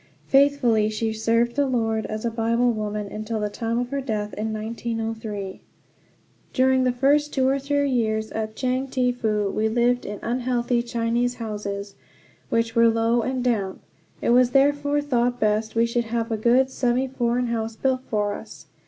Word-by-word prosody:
Faithfully 270 -6 +3
she 220 +1 -2
served 230 +2 +1
the 285 -1 +2
Lord 225 -3 0
as 215 +1 -4
a 235 - 0
Bible 230 +2 +1
woman, 210 -1 -3
until 215 +1 -4
the 210 -1 -2
time 230 +1 -2
of 245 0 -1
her 280 0 -1
death 210 -5 -3
in 220 +1 -3
1903. 220 -2 -4 0.9
During 260 0 +3
the 250 - +3
first 285 +4 +2
two 260 -1 +1
or 270 +1 +2
three 285 +1 0
years 220 -3 0
at 220 0 -4
Chang 255 +2 -1
Te 255 -1 +1
Fu 210 -4 -1
we 220 +1 0
lived 240 +2 +2
in 205 0 -5
unhealthy 240 0 0
Chinese 235 +1 -1
houses, 205 -3 -5 0.6
which 230 0 0
were 230 0 +6
low 230 +1 +2
and 255 +1 -2
damp. 210 -6 -1 0.4
It - - +2
was 245 0 +5
therefore 285 +2 +2
thought 245 -3 0
best 215 0 0
that - - +2
we 230 - +5
should 235 0 -1
have 230 0 -2
a - - +1
good 245 +4 +3
semi 255 +1 +1
foreign 245 -1 0
house 225 -1 -2
built 260 +2 0
for 210 -4 -1
us. - - -10
235 Hz, 180 wpm, -24 LUFS, 220-255 Hz, 0.9 s, were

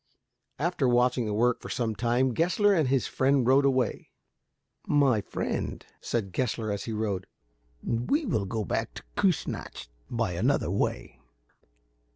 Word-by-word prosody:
After 160 -4 0
watching 125 -1 +2
the 105 - -2
work 120 +2 +2
for - - -8
some 115 -3 -1
time, 120 +3 +1
Gessler 180 - +3
and 160 -7 +2
his 130 0 +1
friend 135 -1 +2
rode 135 +3 +5
away. 130 -5 0 0.8
"My 135 -7 +3
friend," - - -4 0.2
said 100 -6 -2
Gessler, 115 -1 -1
as 100 - -3
he 115 - -4
rode, 105 -4 -2 0.6
"we 200 - 0
will 110 - 0
go 110 +2 -3
back - - -2
to - - -8
Kiissnacht - - -1 0.2
by 115 -5 -1
another 85 - +1
way. - - -2
120 Hz, 145 wpm, -28 LUFS, 110-135 Hz, 0.8 s, rode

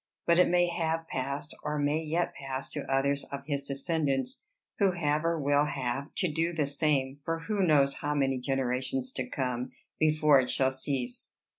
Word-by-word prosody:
But 170 +1 +4
it 180 - +5
may 175 0 +4
have 165 -1 -1
passed, 140 +3 -4
or 150 0 -2
may 145 +2 +1
yet 165 +2 -1
pass, 135 -1 -5
to - - -5
others 140 +1 +2
of 140 0 -7
his 140 -2 -1
descendants, 140 - -1 0.4
who 195 -3 +4
have, 155 -3 0
or 165 0 +1
will 145 0 +3
have, 135 -1 -2
to 185 - +1
do 165 +2 0
the 155 -3 +1
same 140 -1 0
for 165 +1 -2
who 205 +3 -1
knows 145 -6 +4
how 145 0 -2
many 135 -2 +1
generations 130 0 -1
to 130 -1 -3
come? 125 -2 -2 0.3
before 155 -2 +5
it 125 - -3
shall 130 -1 +3
cease. 130 -2 -3
145 Hz, 180 wpm, -29 LUFS, 135-160 Hz, 0.4 s, it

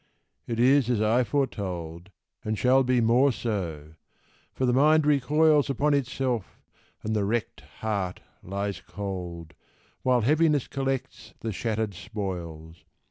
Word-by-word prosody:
it 115 -1 -3
is 130 0 +4
as 120 -4 +1
I 110 +4 +3
foretold, 90 - -3 0.3
And 110 0 -2
shall 130 +3 +4
be 125 -1 +2
more 125 +5 +4
so; 85 -11 -4 0.6
for 130 - -1
the 125 - +2
mind 150 +3 +4
recoils 150 +1 +3
Upon 145 +3 +1
itself, 130 -5 -2 0.4
and 110 0 -1
the 105 - +1
wrecked 110 +3 -2 0.2
heart 100 -5 -2 0.2
lies 100 +1 -4
cold, 90 -5 -6 0.5
While 125 -2 +3
Heaviness 150 +2 +2
collects 135 -1 -4
the 115 - -3
shattered 110 0 -2
spoils. 85 -6 -6
115 Hz, 130 wpm, -27 LUFS, 95-135 Hz, 0.6 s, is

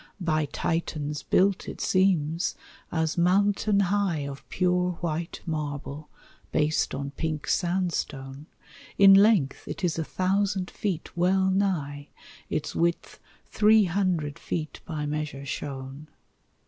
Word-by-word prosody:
By 155 -4 +1
Titans 150 -1 -2
built, 195 +5 +2
it - - -8
seems, 175 -3 +1 0.4
as 160 0 0
mountain 200 +3 +3
high 195 -4 +1
Of 140 0 -9
pure 180 0 +1
white 165 0 -4
marble, 150 -1 -4 0.4
based 150 -1 +1
on 140 0 -4
pink 155 -1 -3
sandstone; 155 -6 -2 0.5
In 195 0 +9
length 195 -8 +4
it - - -6
is 170 -2 0
a - - 0
thousand 190 +2 0
feet 185 -6 -4
well 190 +2 +2
nigh, 155 -8 -1 0.4
Its - - -2
width 170 0 -1 0.3
three 215 0 +4
hundred 175 -6 -1
feet 155 -3 -4
by 155 -3 -3
measure 150 -2 -4
shown. 140 0 -6
170 Hz, 120 wpm, -27 LUFS, 150-190 Hz, 0.5 s, In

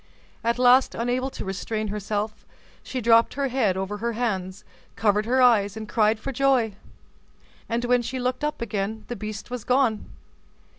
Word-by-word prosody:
At 235 +1 +1
last, 250 +1 +5
unable 245 +3 -1
to - - -7
restrain 215 +3 -3
herself, 210 +1 -3 0.4
she 255 - -5
dropped 230 +1 +4
her 280 -1 0
head 220 -8 +1
over 195 +2 -3
her 235 +2 -2
hands, 200 -4 -3 0.3
covered 210 0 +1
her 255 +1 +3
eyes, 215 -4 +4
and 215 -1 -6
cried 215 0 +2
for 275 - -4
joy; 260 -4 +2 1.0
and, 235 +1 -1
when 245 0 +3
she 260 +2 -4
looked 255 +3 -2
up 300 -5 -2
again, 215 0 -3
the 240 - -3
beast 215 +1 -7
was 250 -3 -4
gone. 250 -4 +1
230 Hz, 165 wpm, -25 LUFS, 210-250 Hz, 1.0 s, last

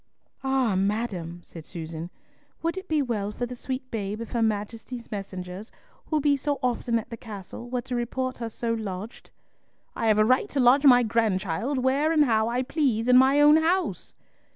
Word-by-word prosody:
"Ah, 265 -5 +1
madam!" 190 -4 -2
said 165 - -11
Susan, 165 0 -7 0.5
"would 335 +1 0
it 380 0 -7
be 310 -4 +1
well 210 -5 -2
for 245 - -3
the 250 +1 -7
sweet 255 +1 -5
babe 210 -1 -3
if 230 - -7
her 235 - 0
Majesty's 225 +3 -3
messengers, 195 0 -6 0.4
who 310 - +1
be 290 0 +3
so 285 +1 -1
often 240 -1 0
at 230 +2 -6
the 230 - -5
castle, 215 +2 -9
were 250 0 -1
to 255 -1 -4
report 255 +2 -2
her 230 -1 -3
so 230 +1 -2
lodged?" 215 0 -6 0.7
"I 225 - -1
have 215 -1 +4
a 215 - +5
right 255 +3 +2
to 280 - -2
lodge 260 +3 +5
my 245 -2 +7
grandchild 220 - 0
where 270 +5 +2
and 305 -2 +4
how 220 -3 +2
I 245 +2 0
please 255 -5 0
in 250 - +6
my 265 +2 +5
own 295 +1 +7
house." 345 +4 0
235 Hz, 190 wpm, -26 LUFS, 210-265 Hz, 0.7 s, my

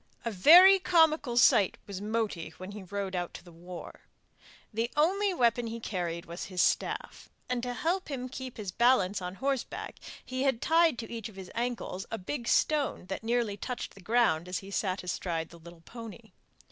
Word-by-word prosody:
A 230 - -1
very 355 - +8
comical 320 -8 +3
sight 205 -5 +5
was 200 -1 -7
Moti 210 -7 -2
when 185 +2 -8
he 210 0 -8
rode 195 0 -4
out 175 -1 -3
to - - -9
the 175 - -15
war. 175 +1 -10 0.7
The 230 +2 -1
only 390 +6 +3
weapon 240 -7 +2
he 230 +1 -5
carried 175 -5 -3
was 170 +2 -6
his 185 -2 -6
staff, - - 0 0.2
and 250 -1 -1
to 245 0 -3
help 345 +10 -1
him 255 -3 -4
to 255 - -12
keep 260 -2 -7
his 205 -4 -5
balance 205 -3 +3
on 180 +1 -5
horseback 270 +2 -3 0.3
he 255 0 -4
had 265 -4 +1
tied 325 -2 +3
to 225 -2 -7
each 225 -2 -5
of 210 - -16
his 190 -2 -9
ankles 235 -5 -3
a 225 - -3
big 235 +5 -5
stone 295 -10 +1
that 195 - -4
nearly 230 -3 0
touched 250 +3 -5
the 195 - -15
ground 180 -5 +2
as 180 - -2
he 195 0 -8
sat 190 -2 -1
astride 170 -2 -3
the 170 - -14
little 170 0 -14
pony. 230 +2 -10
225 Hz, 195 wpm, -30 LUFS, 185-255 Hz, 0.7 s, very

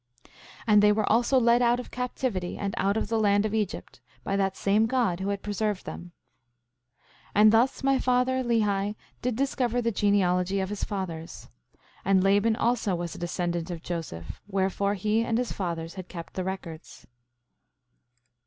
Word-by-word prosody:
5:15 - - -23 0.3
And 210 -2 +5
they 210 0 +6
were 210 0 +1
also 240 +4 +4
led 235 0 +4
out 240 0 +3
of 250 - -8
captivity 245 -7 -3
and 200 -1 -3
out 200 +2 +1
of - - -1
the 225 +1 0
land 205 -1 +3
of 215 - -2
Egypt, 210 -3 -3 0.2
by 195 - -1
that 195 -1 0
same 210 +3 +2
God 225 -8 +1
who 190 +1 -2
had 200 -1 -3
preserved 210 -1 -2
them. 175 0 -8 0.9
5:16 - - -34 0.2
And 215 +1 +6
thus 245 +5 +2
my 270 -1 +3
father, 255 +1 +1
Lehi, 210 -4 +1 0.3
did 250 -2 -1
discover 250 -2 0
the 230 -1 0
genealogy 195 -2 +2
of 190 0 -2
his 210 -1 -4
fathers. 170 -5 -5 0.5
And 190 -1 +3
Laban 205 +3 +3
also 230 -5 +1
was 170 -1 -4
a - - -9
descendant 175 0 -2
of 170 -2 -6
Joseph, 85 - -6
wherefore 200 +1 0
he 215 +3 +1
and 230 -1 0
his 245 0 -1
fathers 165 -3 -4
had 185 -2 -8
kept 170 -2 -8
the 185 - -3
records. 180 -4 -7
205 Hz, 175 wpm, -27 LUFS, 185-230 Hz, 0.9 s, they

